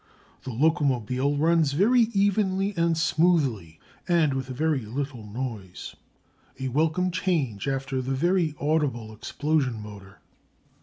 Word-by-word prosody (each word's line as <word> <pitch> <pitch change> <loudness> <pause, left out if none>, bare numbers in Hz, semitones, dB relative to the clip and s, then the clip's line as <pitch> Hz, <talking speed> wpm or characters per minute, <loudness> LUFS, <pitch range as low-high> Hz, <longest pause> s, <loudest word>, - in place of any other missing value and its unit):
The - - -4
locomobile 140 -1 +1
runs 160 -1 +2
very 225 - +4
evenly 200 -1 +1
and 170 -1 +1
smoothly, 145 - +1 0.3
and 165 -5 +3
with 135 -1 -3
very 140 +1 -1
little 125 +1 -5
noise, 105 -4 -6 0.6
a 130 0 -2
welcome 160 +7 +1
change 145 - -1
after 135 -1 -2
the 135 +1 -2
very 170 +1 +1
audible 140 -7 -1
explosion 140 0 -1
motor. 100 -2 -11
145 Hz, 115 wpm, -26 LUFS, 125-170 Hz, 0.6 s, very